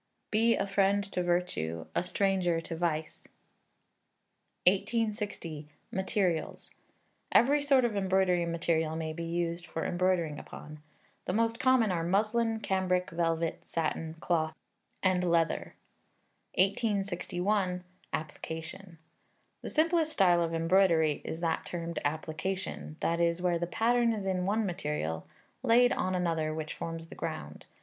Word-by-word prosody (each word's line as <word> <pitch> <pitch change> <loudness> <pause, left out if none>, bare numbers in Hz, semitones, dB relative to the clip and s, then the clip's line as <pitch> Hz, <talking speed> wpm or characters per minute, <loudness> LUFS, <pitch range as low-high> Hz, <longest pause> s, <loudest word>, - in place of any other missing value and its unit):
[BE 230 +2 +4
A 195 - 0
FRIEND 200 0 +2
TO 180 - -1
VIRTUE 175 - -1
A - - +1
STRANGER 180 -1 +1
TO 165 0 -6
VICE.] 160 -2 -2 1.4
1860. 200 -6 0 0.2
Materials. 190 -3 -1 0.6
Every 285 +4 +5
sort 275 -3 +4
of 225 -3 -1
embroidery 190 -3 +2
material 165 -1 0
may 160 -1 -3
be 170 +1 -5
used 170 0 -2
for 160 - -3
embroidering 175 -4 +1
upon. 150 0 -10 0.4
The 180 - -1
most 230 +2 +1
common 255 -5 +4
are 170 -2 0
muslin, 220 +5 +1
cambric, 185 -2 0
velvet, 165 -1 0
satin, 160 0 -2
cloth, 160 -2 0 0.5
and 185 -1 +3
leather. 170 -2 +1 0.8
1861. 195 -1 0 0.3
Application. 160 +3 -6 0.6
The - - -5
simplest 320 0 +2
style 175 -3 +4
of 165 -1 0
embroidery 165 -3 +3
is 160 - -5
that 165 -2 0
termed 170 -1 -4
Application, 160 +2 -3
that 170 +1 +1
is, 170 0 +2
where 175 -1 +1
the 175 - -1
pattern 235 +5 +2
is 205 -3 -4
in 185 -1 0
one 215 +2 +1
material, 150 - -3 0.3
laid 245 0 +5
on 185 -7 0
another 165 -3 0
which 155 -1 -4
forms 165 0 -6
the - - -9
ground. 75 - -6
180 Hz, 130 wpm, -30 LUFS, 165-200 Hz, 1.4 s, Every